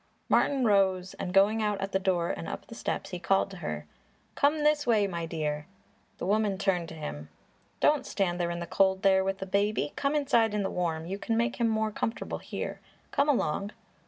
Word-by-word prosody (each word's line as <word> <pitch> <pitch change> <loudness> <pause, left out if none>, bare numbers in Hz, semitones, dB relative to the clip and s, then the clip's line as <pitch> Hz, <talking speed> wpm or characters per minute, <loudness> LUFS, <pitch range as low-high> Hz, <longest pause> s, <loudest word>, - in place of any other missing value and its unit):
Martin 270 -3 +3
rose 190 -3 +2
and 180 - -3
going 200 +4 +4
out 210 -2 0
at 195 0 -3
the 190 - +1
door 180 -3 +1
and 165 - -5
up - - -6
the - - -11
steps, 230 - -3
he 180 - -4
called 195 +2 +1
to 195 - -8
her. 75 - -4 0.5
"Come 295 +2 +2
this 300 -2 +2
way, 215 -4 +4
my 170 -4 -3
dear!" 150 -2 -3 0.5
The - - -4
woman 205 0 +1
turned 180 -4 0
to 160 - -9
him. 75 - -6 0.5
"Don't 290 -3 +3
stand 180 -3 0
in 170 0 -1
the 170 - -4
cold 190 +1 +2
there 190 -1 +5
with 195 0 -1
the 190 - -5
baby; 200 -4 0
come 280 +1 0
inside 235 -7 +2
in 205 - 0
the 195 - -2
warm; 165 -3 -2
you 195 +3 -4
can 225 +1 -1
make 235 +2 0
him 235 - +2
more 220 0 0
comfortable 225 +2 -3
here. - - -5 0.3
Come 285 +1 +2
along!" 200 - 0
195 Hz, 210 wpm, -29 LUFS, 175-220 Hz, 0.5 s, there